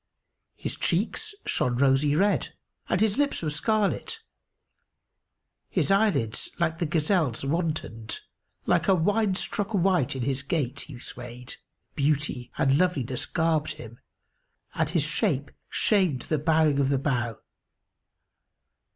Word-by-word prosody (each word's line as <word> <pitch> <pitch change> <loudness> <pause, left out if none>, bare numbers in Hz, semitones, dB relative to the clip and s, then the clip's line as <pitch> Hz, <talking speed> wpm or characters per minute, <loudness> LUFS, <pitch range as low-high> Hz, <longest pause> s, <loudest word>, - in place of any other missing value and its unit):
His - - -3
cheeks 435 -2 0
shone 125 -1 +1
rosy 140 +3 +3
red 200 +4 +1 0.3
and 175 - +2
his 215 +3 +2
lips 285 -10 +1
were 155 - -1
scarlet; 215 - 0 1.5
his - - +1
eyelids 195 - +2
like 165 -1 0
the 170 - 0
gazelle's 155 - +1
wantoned; 150 -8 -2 0.5
like - - +2
a 195 - +6
wine 205 +3 +2
struck 205 +2 -1
wight 180 -8 +2
in 130 - -2
his 135 +1 0
gait 140 -2 -2
he 145 -5 -9
swayed; 125 0 -8 0.4
beauty 140 -3 0
and 135 +2 +3
loveliness 135 -9 0
garbed 160 -2 +1
him, 115 0 -11 0.7
and 160 -2 0
his 165 -3 +2
shape 150 - -1 0.2
shamed 185 - +2
the 155 - -1
bowing 155 -2 +3
of 135 -1 +2
the 140 - +2
bough. 120 -5 -1
155 Hz, 125 wpm, -27 LUFS, 135-185 Hz, 1.5 s, a